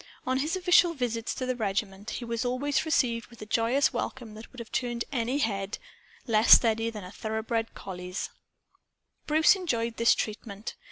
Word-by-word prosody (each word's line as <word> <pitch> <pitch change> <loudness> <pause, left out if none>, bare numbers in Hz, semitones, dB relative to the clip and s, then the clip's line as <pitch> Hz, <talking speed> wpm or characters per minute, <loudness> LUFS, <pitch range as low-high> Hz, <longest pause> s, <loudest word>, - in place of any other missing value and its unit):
On 260 +1 +1
his 305 +5 0
official 360 -2 +4
visits 235 -4 -2
to 255 - -3
the 255 0 -1
regiment, 205 -1 -3
he 240 - -5
was 230 0 -2
always 260 +5 0
received 235 -7 +1
with 235 - -17
a - - -7
joyous 230 +6 +2
welcome 240 -5 -4
that 220 +1 -11
would 255 - -16
have 235 -2 -8
turned 240 -2 -2
any 250 0 0
head 200 -6 -1 0.5
less 220 -1 +6
steady 225 -1 +4
than 215 -3 -7
a 180 - -9
thoroughbred 220 +1 -3
collie's. 180 0 -6 1.0
Bruce 315 +5 +5
enjoyed 235 -11 -2
this 230 - +5
treatment. 210 -1 -5
230 Hz, 170 wpm, -28 LUFS, 220-255 Hz, 1.0 s, less